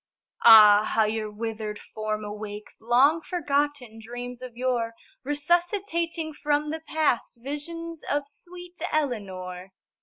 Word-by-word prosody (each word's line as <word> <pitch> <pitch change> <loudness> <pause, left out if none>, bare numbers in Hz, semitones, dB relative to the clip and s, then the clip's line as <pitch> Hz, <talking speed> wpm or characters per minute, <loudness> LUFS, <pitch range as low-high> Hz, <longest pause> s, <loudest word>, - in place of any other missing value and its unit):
Ah, 210 -2 +10
how 220 +1 +2
your 215 0 -1
withered 215 0 -5
form 215 0 -4
awakes 210 0 -8
Long 265 +8 +4
forgotten 290 -8 -1
dreams 245 +2 -7
of 250 -2 -9
yore 240 -3 -1 0.3
Resuscitating 335 +2 0
from 295 0 0
the 320 - -3
past 310 -8 0
Visions 330 +4 -6
of 290 0 +1
sweet 355 +4 -9
Eleanor! 190 -10 -3
255 Hz, 115 wpm, -26 LUFS, 215-310 Hz, 0.3 s, Ah